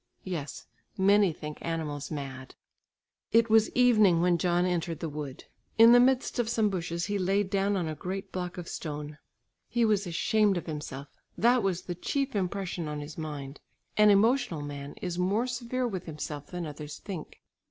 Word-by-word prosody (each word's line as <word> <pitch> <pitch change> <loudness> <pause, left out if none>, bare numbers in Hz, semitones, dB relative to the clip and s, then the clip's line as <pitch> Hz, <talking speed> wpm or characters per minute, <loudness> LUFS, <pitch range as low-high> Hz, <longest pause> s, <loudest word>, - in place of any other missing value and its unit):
Yes, 165 -6 -5 0.3
many 200 0 +5
think 150 -1 -8
animals 150 -4 -3
mad. 135 -3 -6 0.8
It 230 0 +4
was 220 -1 +5
evening 215 -8 +5
when 175 0 +3
John 175 +1 +2
entered 170 -3 -1
the 165 - -3
wood. 145 -3 -6 0.3
In 225 +1 +9
the 245 - +8
midst 255 0 +2
of 230 -2 +1
some 220 -3 +2
bushes 170 -2 -2
he 205 +1 -1
laid 195 +1 +1
down 200 0 +1
on 175 -3 -1
a 155 - -2
great 190 +5 -5
block 180 -1 -4
of 175 -1 -6
stone. 150 -1 -6 0.5
He 235 0 +2
was 210 -3 +1
ashamed 200 +4 +2
of 175 - -4
himself, 145 -3 -6 0.3
that 245 +1 +4
was 185 -3 -1
the 175 - -4
chief 275 - -2
impression 185 -3 -2
on 150 0 -4
his 145 +1 -7
mind. 145 -3 -6 0.4
An 210 0 +6
emotional 205 - +3
man 145 -1 -7
is 180 -1 -3
more 200 +6 +1
severe 250 0 -2
with 190 -6 -5
himself 150 -2 -6
than 175 -1 -5
others 150 0 -7
think. 185 -7 -8
180 Hz, 175 wpm, -29 LUFS, 155-210 Hz, 0.8 s, In